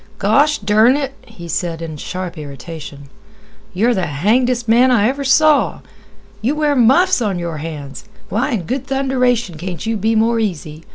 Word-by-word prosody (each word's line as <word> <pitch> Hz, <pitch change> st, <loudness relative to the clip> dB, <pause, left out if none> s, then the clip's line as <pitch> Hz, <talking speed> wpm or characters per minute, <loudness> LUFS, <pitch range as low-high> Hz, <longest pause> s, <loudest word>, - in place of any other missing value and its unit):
"Gosh 285 Hz, +9 st, +3 dB
dern 215 Hz, +6 st, +3 dB
it!" 275 Hz, -2 st, -3 dB
he 170 Hz, -1 st, -11 dB
said 165 Hz, 0 st, -3 dB
in 165 Hz, -2 st, -6 dB
sharp 180 Hz, +4 st, -6 dB
irritation; 145 Hz, 0 st, -9 dB, 0.6 s
"you're 225 Hz, +7 st, +1 dB
the 185 Hz, -5 st, -1 dB
hangdest 235 Hz, -, +1 dB
man 240 Hz, +3 st, +5 dB
I 225 Hz, -4 st, +3 dB
ever 275 Hz, +3 st, -2 dB
saw! 300 Hz, +2 st, +3 dB, 0.6 s
You 255 Hz, +7 st, 0 dB
wear 300 Hz, -1 st, +1 dB
muffs 270 Hz, +7 st, +4 dB
on 205 Hz, -5 st, -1 dB
your 170 Hz, -2 st, -4 dB
hands. 150 Hz, -3 st, -7 dB, 0.2 s
Why 220 Hz, +7 st, -1 dB
in 205 Hz, -6 st, -2 dB
good 260 Hz, +7 st, -4 dB
thunderation 250 Hz, -, 0 dB
can't 180 Hz, +2 st, -6 dB
you 225 Hz, 0 st, -1 dB
be 220 Hz, +3 st, 0 dB
more 225 Hz, +1 st, +2 dB
easy? 165 Hz, -6 st, -4 dB
220 Hz, 165 wpm, -17 LUFS, 170-255 Hz, 0.6 s, man